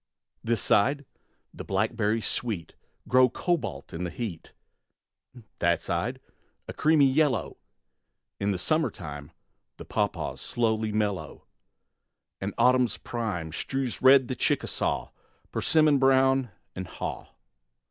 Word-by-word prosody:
This 115 -3 0
side, 140 +7 +2 0.5
blackberries 110 +2 -1
sweet 105 -9 -2 0.3
Glow 130 0 +5
cobalt 145 - -2
in 85 +2 -4
the 90 - -2
heat; 95 -6 -6 1.1
That 85 0 +2
side, 115 +10 -2 0.5
a - - -6
creamy 155 -2 +4
yellow, 140 +1 +1 0.8
In 100 -1 0
summertime 85 - -2 0.5
The - - -9
pawpaws - - -2
slowly 110 -2 0
mellow; 105 -3 -2 0.9
And - - -4
autumn's 125 -3 +3
prime 105 -9 -4
Strews 135 - -3
red 130 -1 +7
the 130 - -3
Chickasaw, - - -1 0.4
Persimmon 150 0 +3
brown 135 -1 +4 0.3
and 95 -1 -5
haw. - - -6
115 Hz, 105 wpm, -27 LUFS, 100-135 Hz, 1.1 s, red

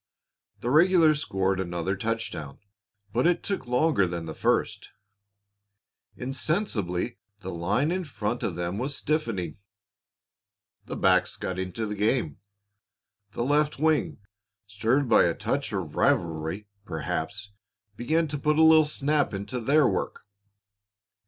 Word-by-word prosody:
The 120 - -1
regulars 160 -1 +5
scored 95 -5 0
another 90 +1 -2
touchdown, 95 -9 -4 0.6
but 125 +7 +3
it 175 - +1
took 195 -10 -3
longer 125 - +2
than 85 -1 -4
the 80 - -6
first. - - 0 1.3
Insensibly 125 - -2 0.2
the 95 -1 -5
line 105 - 0
in 185 0 -2
front 110 -3 -3
of 90 - -2
them 90 +3 -3
was 140 +3 -2
stiffening. 115 - -2 1.3
The - - -4
backs - - +2
got 95 0 -4
into 95 +4 -3
the 105 - -3
game; 105 - 0 0.9
the 120 - -2
left 150 +3 +1
wing, 155 +1 +1 0.5
stirred 115 +7 0
by 115 - +5
a 85 - +1
touch 140 0 -2
of 95 -7 -4
rivalry, 80 +4 0 0.2
perhaps, 90 +4 -4 0.4
began 160 +9 +1
to 145 0 -4
put 150 +2 +1
a 160 - +6
little 160 -1 +7
snap 145 -4 0
into 100 +6 -4
their 140 +4 +4
work. - - -2
115 Hz, 130 wpm, -27 LUFS, 95-150 Hz, 1.3 s, little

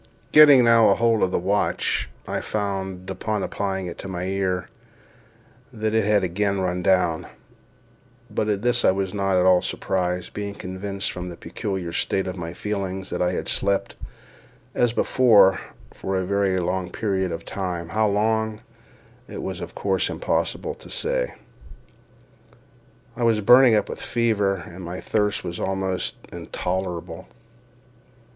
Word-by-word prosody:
Getting 145 -4 +8
now 115 -1 +6
hold 115 -1 +2
of - - +3
the - - 0
watch, 100 +4 0 0.2
I - - -2
found, 95 -3 -3
upon 105 +2 -2
applying 95 -2 -2
it 85 - -7
to - - -7
my 90 -2 -4
ear, 95 -1 -1 1.0
that 110 0 -2
it 110 -2 +2
had 105 -1 +3
again 100 +2 0
run 90 -1 -1
down; 90 -3 +2 1.0
but 110 -1 -2
at 105 0 -1
this 120 0 +2
I - - +6
was 95 0 -1
not 95 -2 +1
at 90 - +3
all 90 -1 +5
surprised, 90 -1 -2
being 100 0 -5
convinced, 95 +1 -4
from 90 0 -6
the 85 - -9
peculiar 95 -5 -4
state 95 +2 0
of 95 - -4
my 85 -2 -5
feelings, 95 0 -4
that - - -2
I 90 0 +1
had - - -3
slept, 100 0 0 0.8
as 120 -1 +2
before, 105 -6 +4 0.3
for 95 0 -3
a 95 - -1
very 100 -1 +1
long 90 0 -2
period 95 -3 -1
of 85 0 -6
time, 90 -4 -4
how 110 +4 +2
long, 110 +1 0 0.7
it - - -7
was - - -5
of - - -8
course - - 0
impossible - - -1
to - - -12
say. - - 0 1.8
I 120 - -7
was 115 -2 +3
burning 120 +3 +7
up 105 - +1
with - - -7
fever, 110 -5 +1
and 90 +2 -10
my 85 +2 -5
thirst 105 -2 0
was 85 0 -5
almost 95 -1 -2 0.2
intolerable. 90 -1 -4
95 Hz, 150 wpm, -23 LUFS, 90-105 Hz, 1.8 s, Getting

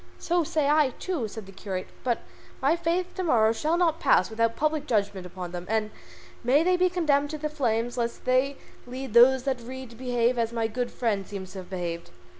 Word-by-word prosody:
"So 345 0 +1
say 305 -1 0
I 295 -3 +3
too," 330 -12 -2
said 215 0 -8
the 195 - -12
curate, 190 -1 -5
"and - - -24
by 240 -2 +1 0.5
my - - +4
faith 345 +2 -1
to 375 - -3
morrow 225 -9 +4
shall 305 +9 0
not 335 -2 +2
pass 225 -7 +3
without 230 +1 +1
public 305 -1 0
judgment 200 -5 0
upon 180 -1 -7
them, 175 0 -6
and 215 -1 0 0.5
may 270 +6 +4
they 365 +1 +3
be 365 0 +3
condemned 295 -5 +1
to 310 - -4
the 305 0 -3
flames 245 -4 -1
lest 235 0 -3
they 260 +2 +2 0.3
lead 255 -1 -6
those 250 +2 +7
that 260 -3 -1
read 260 +1 -8
to - - -13
behave 245 0 +1
as 230 0 0
my 230 -1 -1
good 245 +2 -2
friend 205 -5 -1
seems 190 -2 -7
to 190 - -7
have 180 -1 -10
behaved." 170 -2 -4
245 Hz, 220 wpm, -27 LUFS, 220-300 Hz, 0.5 s, those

